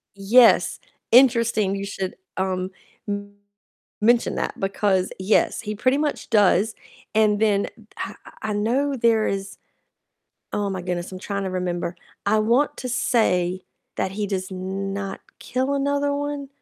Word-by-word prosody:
Yes, 225 +5 +5 0.3
interesting 230 -5 +4
you 200 0 -4
should, 195 -2 -4 0.2
um, 185 0 -1 1.3
mention 235 +2 +3
that, - - -3
because 195 -1 +1
yes, 190 +3 +2
he 210 -1 -4
pretty 255 +6 +2
much 295 -3 -2
does. 210 0 +4 0.4
And 210 -1 +4
then 205 -2 +3
h - - -12 0.3
I - - -4 0.3
I 215 - -2
know 255 +7 0
there 230 -2 +3
is 195 0 -3 0.9
Oh 205 -1 -1
my 190 -2 -4
goodness, 175 0 -3
I'm 185 - -7
trying 200 +1 -3
to 190 - -2
remember. 180 -1 -2 0.3
I 215 +2 +3
want 235 +7 +2
to 255 - -5
say 185 -7 +1 0.3
that 190 0 -1
he 210 +1 -2
does 190 -1 -3
not 195 +1 -4 0.2
kill 260 +3 -1
another 285 +1 +1
one. 290 -1 -3
205 Hz, 140 wpm, -23 LUFS, 190-235 Hz, 1.3 s, Yes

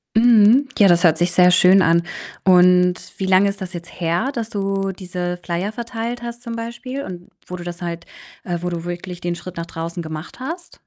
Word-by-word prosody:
Mhm, 235 +3 +5
ja, 200 - +7
das 175 0 +4
hört 160 -2 +5
sich 175 +1 +1
sehr 180 0 +5
schön 185 +1 +6
an 170 0 +4 0.4
und 180 -1 +5 0.2
wie 190 - -2
lange 190 +2 +4
ist 200 0 -7
das 185 -1 -6
jetzt 175 +1 -9
her, 170 +11 0
dass 230 -3 -4
du 195 -2 -2
diese 180 -1 -5
Flyer 180 +4 -2
verteilt 235 +1 -5
hast 235 0 -7
zum 235 -2 -6
Beispiel 240 +4 -6
und 175 -1 -9 0.2
wo 180 - -7
du 175 - -8
das 175 0 -7
halt 170 -1 -5 0.4
äh, 175 -1 -3
wo 180 - -2
du 170 -1 -4
wirklich 175 0 -6
den 175 0 -2
Schritt 175 0 -10
nach 170 - -4
draußen 170 +1 -5
gemacht 160 +5 -8
hast? 330 +7 -7
180 Hz, 210 wpm, -20 LUFS, 175-225 Hz, 0.4 s, ja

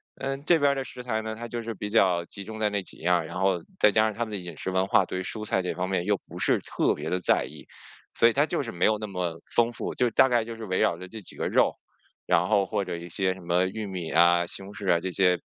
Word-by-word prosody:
嗯， 135 +1 -4
这 170 0 +5
边 145 -2 +3
儿 - - -1
的 135 - -2
食 125 -1 -9
材 110 -3 -1
呢， 110 0 -5
它 120 +1 -6
就 120 0 -4
是 115 0 -5
比 105 +1 -5
较 90 -6 +3
集 100 +3 -9
中 110 +2 -8
在 110 -1 +1
那 100 -1 0
几 - - -10
样 90 +2 +2
儿， 80 - -4
然 - - -6
后 95 -2 +2 0.2
再 105 - +6
加 110 +2 +4
上 110 - 0
他 120 - -1
们 110 - -9
的 105 - -3
饮 85 -3 -8
食 95 - -3
文 95 +1 +1
化， 100 -1 +4
对 95 +1 -4
蔬 105 +3 -5
菜 95 - +1
这 90 -2 -3
方 90 +2 -2
面 90 -2 0
又 105 0 +2
不 - - -12
是 - - +2
特 - - 0
别 - - -6
地 90 - +1
在 - - +2
意。 - - -12 0.5
所 115 - +6
以 115 - +2
它 145 +4 +2
就 145 - -1
是 115 - -6
没 85 - 0
有 110 - +3
那 110 - -5
么 90 -4 -3 0.2
丰 120 0 +4
富， 120 - -4
就 125 -1 +1
大 130 - +5
概 120 -3 +2
就 115 0 -7
是 110 -1 -7
围 95 -1 -1
绕 85 - +2
着 95 +1 -9
这 110 +3 -9
几 - - -11
个 - - -2
肉， - - +3 0.5
然 85 +2 +3
后 100 -3 +3
或 100 - -1
者 90 -2 -4
一 85 +1 -9
些 95 +2 0
什 95 - -12
么 90 +2 +2
玉 110 +2 -5
米 90 -4 -5
呀、 85 +1 +4
西 95 - -7
红 100 +1 -10
柿 100 -3 -1
啊， 85 - +4
这 95 +2 -4
些 90 -1 +3
100 Hz, 330 characters per minute, -27 LUFS, 90-110 Hz, 0.5 s, 再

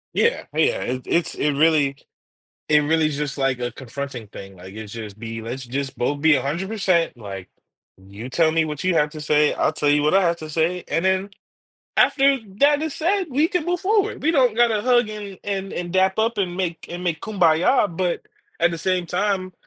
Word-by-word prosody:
Yeah, 470 +1 +1
yeah, - - +1
it's 130 0 -4
it's 170 -1 +1
it 150 - +1
really 145 -2 +3 0.7
it 150 -1 +5
really 155 +1 +2
just 145 -1 -3
like 135 -2 +1
a 120 -1 -3
confronting 130 -1 -7
thing, 95 -1 -11
like 95 +2 -12
it's 110 -1 -8
just 110 -3 -8
be 115 0 -6
"Let's 120 +4 -6
just 135 +2 -4
both 145 +4 -1
be 160 0 +5
100%, 170 - 0
like, 95 -4 -8 0.5
you 100 +5 -10
tell 160 +4 +2
me 160 0 +2
what 150 0 -5
you 185 -1 +2
have 150 -2 +3
to 155 - -9
say, 150 0 +2
I'll - - +1
tell 150 -1 -1
you 145 0 +4
what 150 - +2
I 195 - +6
have 170 -1 +2
to 155 -1 -8
say," 170 +3 0
and 165 - 0
then 190 +1 +1 0.7
after 275 0 +4 0.2
that 290 +2 +4
is 315 -2 -3
said, 375 +3 0
we 295 +5 +2
can 360 -3 -1
move 350 +1 -1
forward. 410 +1 0
We 310 - +3
don't 260 -8 +3
gotta 230 -3 +3
hug 245 -2 +3
and, 205 -3 -8
and 195 -1 -3
and 175 -1 -4
dap 190 +1 +2
up 225 +1 +1
and 180 -3 -1
make 175 -3 -3
and 175 +1 -6
make 165 -3 -1
kumbaya, 180 +1 +2
but 180 -1 -1 0.4
at 170 +1 +4
the 165 - -5
same 180 +1 0
time, 185 +1 -1
165 Hz, 205 wpm, -22 LUFS, 140-205 Hz, 0.7 s, I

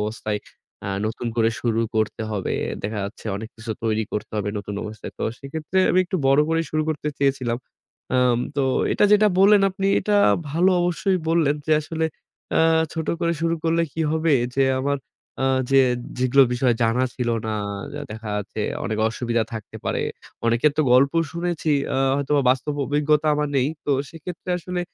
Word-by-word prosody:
অবস্থায়, 105 0 -2 0.4
এ্যা 100 - -3 0.2
নতুন 110 +2 -4
করে 115 0 +3
শুরু 115 -2 +1 0.2
করতে 110 0 0
হবে, 105 -3 -2 0.3
দেখা 105 +1 -3
যাচ্ছে 100 +3 -8
অনেক 110 +2 -6
কিছু 115 0 -7
তৈরি 110 -1 0
করতে 105 - -4
হবে 105 -1 -1
নতুন 100 0 -6
অবস্থায়। 105 -1 -7
তো - - -4 0.2
সেক্ষেত্রে 155 +6 -3
আমি 185 - +3
একটু 185 +1 -2
বড় 135 +2 +5
করেই 165 0 +1
শুরু 155 0 +1
করতে 150 -1 -2
চেয়েছিলাম। 130 -4 0 0.5
অ্যাম 125 -2 +3 0.2
তো 140 - +2 0.3
এটা - - +3
যেটা 210 0 +6
বললেন 200 +1 +6
আপনি 195 +1 -2
এটা 210 -1 +1 0.3
ভালো 175 +6 +3
অবশ্যই 175 +2 +1
বললেন 165 -3 +3
যে 155 - +3
আসলে 160 +1 -3 0.5
এ্যা 160 - +4 0.3
ছোট 160 -1 -4
করে 170 0 +1
শুরু 165 0 +2
করলে 165 +1 +2
কী 165 - -4
হবে 160 -1 +2 0.2
যে 135 - +3 0.2
আমার 140 +1 0 0.4
আ 135 - +2 0.2
যে 135 - +6 0.4
যেগুলো 130 +2 +5
বিষয় 125 -1 +2
জানা 115 +3 +2
ছিল 125 -2 -2 0.2
না, 110 - -1 0.4
যা 145 - -5
দেখা 110 0 -6
যাচ্ছে 105 +1 -5 0.2
অনেক 110 0 -2
অসুবিধা 115 0 -1
থাকতে 110 -2 -7
পারে। - - -1 0.4
অনেকের 120 +6 +3
তো 155 - +5
গল্প 135 +3 +5 0.2
শুনেছি 170 -2 -2 0.2
এ্যা - - -1 0.2
হয়তোবা 140 0 +1
বাস্তব 135 +3 0
অভিজ্ঞতা 150 +1 +2
আমার 150 0 0
নেই। 130 +1 +2 0.2
তো - - -1 0.2
সেক্ষেত্রে 165 +2 -7
আসলে 180 +1 -4
140 Hz, 175 wpm, -23 LUFS, 115-165 Hz, 0.5 s, যেটা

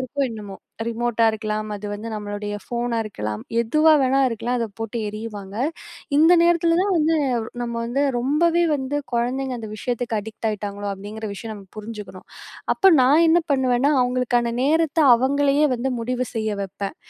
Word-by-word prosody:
இருக்கோ, 270 +2 -2
என்னமோ. 205 -3 -8 0.3
ரிமோட்டா 235 0 0
இருக்கலாம், 215 0 -3
அது 205 +1 -6
வந்து 215 +3 -6
நம்மளுடைய 205 0 -5
ஃபோனா 240 -1 -2
இருக்கலாம், 105 - -5 0.2
எதுவா 305 +7 +3
வேணா 265 +1 +3
இருக்கலாம் 240 +2 -2
அதை 230 - -1
போட்டு 225 +1 -4
எறியுவாங்க. 210 -2 -7 0.6
இந்த 325 +3 +6
நேரத்தில 340 0 +3
தான் 400 -2 +1
வந்து, 320 +1 +2 0.5
நம்ம 235 -1 -3
வந்து 250 +4 -1 0.2
ரொம்பவே 330 +7 +2
வந்து 270 +1 -3 0.2
குழந்தைங்க 255 +2 -1
அந்த 220 - -6
விஷயத்துக்கு 240 0 -2
அடிக்ட் 220 +1 -5
ஆயிட்டாங்களோ 205 -1 -4
அப்படிங்கிற 210 +3 -7
விஷயம் 220 +2 -7
நம்ம 200 -1 -12
புரிஞ்சுக்கணும். 210 -3 -9 0.5
அப்போ 390 - +4
நான் 290 +6 +5
என்ன 335 +2 +5
பண்ணுவேன்னா, 260 +1 +2
அவங்களுக்கான 245 -1 +1
நேரத்தை 320 +2 +2
அவங்களையே 280 +4 +2
வந்து 255 +2 -2
முடிவு 250 +2 -2
செய்ய 220 -1 -1
வைப்பேன். 195 +1 -5
235 Hz, 150 wpm, -22 LUFS, 215-275 Hz, 0.6 s, இந்த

